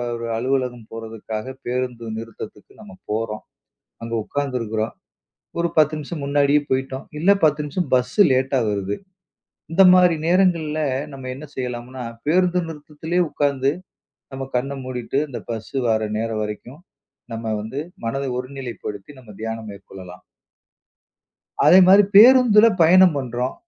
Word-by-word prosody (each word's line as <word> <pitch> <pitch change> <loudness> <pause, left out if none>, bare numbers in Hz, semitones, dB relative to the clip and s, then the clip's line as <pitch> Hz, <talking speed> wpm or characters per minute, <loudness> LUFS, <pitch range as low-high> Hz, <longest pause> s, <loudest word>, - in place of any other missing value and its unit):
ஒரு 115 0 -5
அலுவலகம் 125 -2 -2
போறதுக்காகப் 115 +3 -7
பேருந்து 125 -1 -3
நிறுத்தத்துக்கு 110 -2 -9
நம்ம 210 -2 -12 0.2
போறோம். 110 0 -3 0.6
அங்கு 115 0 -4
உக்காந்து 140 +1 -3
இருக்குறோம். 110 -1 -3 0.7
ஒரு 170 0 +1
10 155 0 +4
நிமிஷம் 150 +1 -6
முன்னாடியே 140 +1 +3
போயிட்டோம். 130 0 -2
இல்ல, 175 +6 +3
10 150 -1 +2
நிமிஷம் 150 +3 -3
பஸ்ஸு 125 +10 +3
லேட்டா 130 +1 +1
வருது. 100 0 -2 0.8
இந்த 195 - +5
மாரி 180 -2 +5
நேரங்கள்ல 170 -4 +2 0.3
நம்ப 135 -1 -9
என்ன 145 +4 -9
செய்யலாம்னா, 125 0 -5 0.2
பேருந்து 180 +3 +2
நிறுத்தத்திலே 160 +2 -4
உக்கார்ந்து 140 -1 0 0.6
நம்ப 135 0 -5
கண்ண 135 +3 -3
மூடிட்டு 130 0 -4
அந்த 125 - -6
பஸ்ஸு 115 +4 -6
வர்ற 110 -1 +1
நேரம் 110 -1 -2
வரைக்கும், 105 +7 -7 0.5
நம்ப 115 0 -5
வந்து 115 +7 -5 0.2
மனதை 135 +4 -2
ஒருநிலைப்படுத்தி 125 -4 -7
நம்ம 115 -5 -14
தியானம் 110 -1 -5
மேற்கொள்ளலாம். 95 -2 -12 1.4
அதே 180 - +7
மாரி 195 +2 +8
பேருந்துல 230 -1 +8
பயணம் 180 +1 +6
பண்றோம். 125 -1 -3
130 Hz, 125 wpm, -21 LUFS, 115-150 Hz, 1.4 s, மாரி